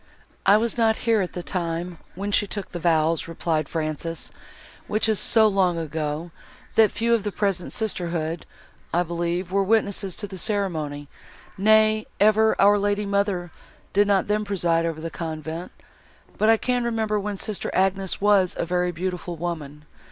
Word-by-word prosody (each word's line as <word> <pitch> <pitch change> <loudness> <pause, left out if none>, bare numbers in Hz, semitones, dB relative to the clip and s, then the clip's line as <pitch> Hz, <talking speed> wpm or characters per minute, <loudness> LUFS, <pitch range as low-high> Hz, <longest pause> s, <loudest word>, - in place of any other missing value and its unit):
"I 200 +2 +7
was 235 +2 -1
not 225 -1 +3
here 225 -3 +3
at 180 - -3
the 175 - -5
time, 170 -1 -3 0.2
when 200 +3 -3
she 205 - +2
took 200 0 -5
the 175 - -5
vows," 165 -1 +2
replied 160 -2 -2
Frances, 160 +1 -3 0.6
"which 215 +1 0
is 220 -2 +2
so 220 -1 +5
long 190 -4 +2
ago, 160 +1 -3 0.4
that 220 -2 +5
few 230 +2 0
of 230 -3 +2
the 205 - -2
present 195 -3 -1
sisterhood, 170 -6 -2 0.4
I 175 +1 +2
believe, 175 +1 -2
were 195 +1 +2
witnesses 200 -2 0
of 205 - -4
the 190 -1 -7
ceremony; 160 -8 -2 0.5
nay, 215 +1 +4
ever 215 +1 +4
our 205 +1 +6
lady 205 +1 0
mother 200 -3 -1 0.4
did 205 +1 +4
not 200 -2 +3
then 210 +1 0
preside 170 -5 +1
over 160 -1 -4
the 165 +1 -5
convent: 160 +1 -5 0.6
but 215 - +2
I 225 - +6
can 245 +1 0
remember, 220 -3 0
when 205 0 -4
sister 210 +1 -3
Agnes 190 0 0
was 200 -3 +3
a - - -1
very 180 +1 0
beautiful 175 0 -4
woman. 150 -3 -5
190 Hz, 165 wpm, -24 LUFS, 170-210 Hz, 0.6 s, I